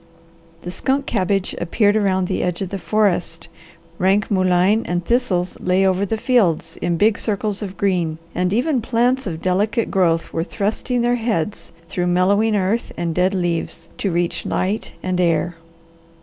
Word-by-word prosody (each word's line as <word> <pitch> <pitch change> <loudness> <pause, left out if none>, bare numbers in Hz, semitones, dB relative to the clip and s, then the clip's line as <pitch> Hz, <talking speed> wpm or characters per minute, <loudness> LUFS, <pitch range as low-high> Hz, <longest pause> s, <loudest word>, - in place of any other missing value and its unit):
The 175 - -5
skunk 270 +8 -1
cabbage 195 -2 0
appeared 205 +4 +2
around 190 -3 +2
the - - -1
edge 180 -1 -1
of 190 - -5
the 195 - -4
forest, 185 -5 0 0.5
rank 195 +3 +2
mullein 185 +3 +3
and 175 0 -2
thistles 195 -7 0
lay 185 +1 +2
over 190 +1 +1
the 225 - -1
fields 190 -9 +1
in 175 -1 0
big 210 +4 +3
circles 210 -1 -1
of 195 -3 -6
green, 175 -5 0 0.2
and 180 +1 0
even 250 +4 +1
plants 245 +1 +1
of 165 -2 -5
delicate 210 +5 0
growth 170 -4 +1
were 165 - 0
thrusting 220 +6 -2
their 240 0 +2
heads 215 -5 -2 0.2
through 180 +1 -2
mellowing 200 +5 +3
earth 205 +4 0
and 170 -1 -1
dead 185 +3 +1
leaves, 170 -2 -2
to 200 - 0
reach 175 0 -1
light 200 +4 -2
and 185 -1 0
air. 175 0 +1
190 Hz, 165 wpm, -20 LUFS, 175-215 Hz, 0.5 s, mullein